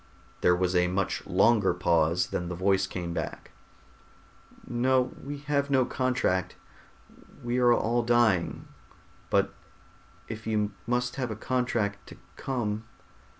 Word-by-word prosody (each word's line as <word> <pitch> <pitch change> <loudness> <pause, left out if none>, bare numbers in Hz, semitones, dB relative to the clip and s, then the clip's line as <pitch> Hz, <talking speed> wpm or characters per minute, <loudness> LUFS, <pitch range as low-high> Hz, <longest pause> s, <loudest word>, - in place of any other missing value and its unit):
There 90 - +5
was 90 0 0
a 90 0 +4
much 95 +2 -2
longer 100 0 +3
pause. 85 -1 +2
Then 90 -1 -2
the 90 - -4
voice 95 +2 +2
came 85 -2 -4
back, - - -5 1.1
"No, 125 +1 +1
we 145 +1 -5
have 140 -1 0
no 130 -2 +3
contract. 125 -10 0 0.9
We 120 +1 0
are 120 -1 +5
all 120 0 +2
dying, 120 -7 +2 0.6
but - - +2 0.7
if 110 0 -7
you 105 -2 0 0.2
must 125 +1 -1
have 130 -3 -2
a 110 - -4
contract 115 -4 -1
to - - -12 0.2
come...." 110 -5 -3
110 Hz, 130 wpm, -28 LUFS, 95-125 Hz, 1.1 s, There